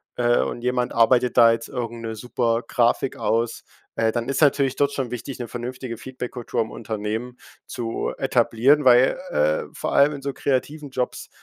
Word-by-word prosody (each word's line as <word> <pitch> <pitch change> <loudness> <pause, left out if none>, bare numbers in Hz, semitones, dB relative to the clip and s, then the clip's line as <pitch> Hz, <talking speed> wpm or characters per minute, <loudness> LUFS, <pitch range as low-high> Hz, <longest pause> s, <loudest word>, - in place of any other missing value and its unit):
äh, 120 0 +2
und - - -3
jemand 125 0 0
arbeitet 120 +2 +3
da 115 0 +8
jetzt 115 0 -3
irgend 120 -2 -5
'ne 110 -1 -5
super 115 +1 -1
Grafik 120 +2 +1
aus, 115 +1 -1 0.3
äh, 115 -1 +1
dann 120 +1 -3
ist 135 - -1
natürlich 140 -3 +3
dort 140 0 +1
schon 135 -4 -3
wichtig, 125 +2 -6
'ne 120 - -5
vernünftige 120 0 -6
Feedbackkultur 125 0 -4
im 110 - -10
Unternehmen 110 +3 -4 0.3
zu 115 -2 -3
etablieren, 130 +3 +3
weil, 125 +1 +5
äh, 75 +1 +1
vor - - -3
allem 145 +2 +5
in 140 - -8
so 140 0 -3
kreativen 145 +3 -2
Jobs 125 -1 -4
120 Hz, 175 wpm, -23 LUFS, 115-130 Hz, 0.3 s, da